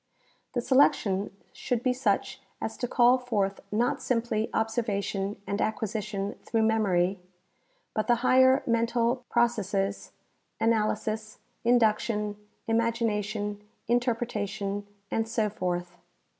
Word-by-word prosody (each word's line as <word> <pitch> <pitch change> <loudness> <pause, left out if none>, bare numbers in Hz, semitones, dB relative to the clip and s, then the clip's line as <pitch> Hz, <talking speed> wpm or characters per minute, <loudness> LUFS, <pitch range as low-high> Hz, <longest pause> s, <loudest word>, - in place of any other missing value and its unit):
The 245 - 0
selection 235 -7 +3 0.2
should 245 -1 -2
be 255 - +2
such 265 +3 0 0.2
as 220 - -4
to 245 - -2
call 245 +1 +5
forth 205 -6 -1
not 235 +4 +1
simply 230 -2 0
ob 220 0 +1
servation 205 -3 -2
a - - -2
nd 200 - -1
acquisition 210 -2 -2
through 225 -1 0
memory, 195 -4 +2 0.7
but 215 - -1
the 240 - +5
higher 260 +1 +5
mental 235 +1 +1
processes, 205 -4 0 0.5
analysis, 215 -1 0 0.3
induction, 215 -3 +2 0.3
imagination, 215 -3 0 0.3
interpreta 235 -3 0
tion, 200 +1 -4 0.2
and 225 0 0
so 225 -2 0
forth. 180 -2 -3
220 Hz, 115 wpm, -28 LUFS, 205-240 Hz, 0.7 s, call